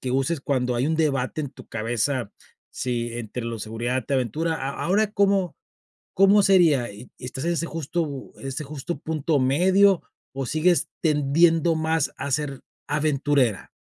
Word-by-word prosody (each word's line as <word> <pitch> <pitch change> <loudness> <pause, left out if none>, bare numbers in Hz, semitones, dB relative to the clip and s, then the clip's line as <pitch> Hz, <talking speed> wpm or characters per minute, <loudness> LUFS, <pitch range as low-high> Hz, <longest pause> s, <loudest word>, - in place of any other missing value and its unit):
que 130 - -3
uses 135 +4 0
cuando 125 -3 0
hay 125 +4 +1
un 160 - 0
debate 145 -3 0
en 140 - -5
tu - - -13
cabeza, 115 +1 -1 0.4
si 120 -1 -3
entre 120 +1 -5
lo 115 -1 -4
seguridad 120 +4 -2
te - - -5
aventura, 145 +6 0
¿A 135 -2 -3
ahora 205 +3 +2
cómo 195 -4 +2 0.6
cómo 195 +2 +6
sería? 165 -11 +4
y 105 +5 -12
¿estás 125 +1 -6
en 170 - +1
ese 170 0 -1
justo 160 -3 -4
en 135 - -7
ese 135 +3 -4
justo 150 +3 -5
punto 155 -1 0
medio 185 +8 +4 0.3
o 135 0 -3
sigues 165 +3 +2
tendiendo 160 +2 +3
más 160 -2 0
a 140 +2 -5
ser 140 -1 -2 0.3
aventurera? 145 -6 +1
145 Hz, 160 wpm, -24 LUFS, 130-165 Hz, 0.6 s, cómo